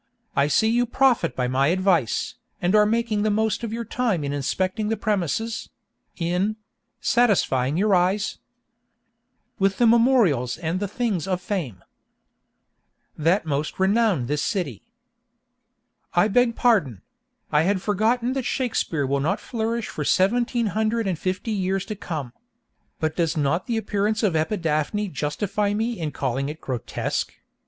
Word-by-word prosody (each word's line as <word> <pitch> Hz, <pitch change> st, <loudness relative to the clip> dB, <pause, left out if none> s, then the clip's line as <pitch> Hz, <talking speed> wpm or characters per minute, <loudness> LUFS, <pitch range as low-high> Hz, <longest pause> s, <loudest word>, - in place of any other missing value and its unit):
I 140 Hz, +1 st, +3 dB
see 150 Hz, +9 st, +3 dB
you 240 Hz, +1 st, +2 dB
profit 250 Hz, -, +2 dB
by 125 Hz, -1 st, 0 dB
my 130 Hz, +2 st, +2 dB
advice, 180 Hz, -, +1 dB, 0.3 s
and 180 Hz, +2 st, +1 dB
are 210 Hz, -1 st, +5 dB
making 225 Hz, -1 st, 0 dB
the 215 Hz, -, +2 dB
most 220 Hz, +2 st, 0 dB
of 230 Hz, -, -3 dB
your 230 Hz, +1 st, -4 dB
time 220 Hz, -8 st, -1 dB
in 140 Hz, 0 st, -2 dB
inspecting 185 Hz, -, -1 dB
the 225 Hz, -, 0 dB
premises—in 200 Hz, -1 st, -3 dB, 0.4 s
—satisfying 160 Hz, -, +2 dB
your 205 Hz, +2 st, +2 dB
eyes 190 Hz, +3 st, +1 dB, 1.2 s
With 195 Hz, 0 st, +2 dB
the 240 Hz, -, +4 dB
memorials 225 Hz, -, +3 dB
and 165 Hz, +2 st, -2 dB
the 205 Hz, -, -2 dB
things 205 Hz, -5 st, -2 dB
of 185 Hz, -2 st, 0 dB
fame 175 Hz, -, -4 dB, 1.3 s
That 165 Hz, +5 st, +1 dB
most 150 Hz, +2 st, -2 dB
renown 195 Hz, -, +2 dB
this 145 Hz, +3 st, -1 dB
city.— 155 Hz, -, -2 dB, 1.3 s
I 175 Hz, +4 st, +5 dB
beg 235 Hz, +2 st, +3 dB
pardon; 175 Hz, -, +2 dB, 0.5 s
I 150 Hz, -, +4 dB
had 190 Hz, +4 st, +1 dB
forgotten 225 Hz, +6 st, +1 dB
that 270 Hz, -, -1 dB
Shakespeare 235 Hz, -, -1 dB
will 140 Hz, +1 st, 0 dB
not 145 Hz, +4 st, 0 dB
flourish 230 Hz, -1 st, -3 dB
for 150 Hz, -, -4 dB
seventeen 235 Hz, -, +2 dB
hundred 220 Hz, +1 st, 0 dB
and 185 Hz, -5 st, -1 dB
fifty 185 Hz, +4 st, -2 dB
years 195 Hz, -1 st, -1 dB
to 215 Hz, -, -5 dB
come. 150 Hz, -11 st, -5 dB, 0.7 s
But 155 Hz, 0 st, -1 dB
does 165 Hz, -2 st, 0 dB
not 150 Hz, +4 st, 0 dB
the 235 Hz, -2 st, 0 dB
appearance 215 Hz, +1 st, -1 dB
of 200 Hz, -5 st, +2 dB
Epidaphne 165 Hz, +3 st, 0 dB
justify 200 Hz, +8 st, -1 dB
me 225 Hz, 0 st, -2 dB
in 160 Hz, -2 st, -2 dB
calling 135 Hz, -1 st, -2 dB
it 155 Hz, +2 st, -7 dB
grotesque? 125 Hz, -4 st, -3 dB
195 Hz, 145 wpm, -24 LUFS, 155-220 Hz, 1.3 s, are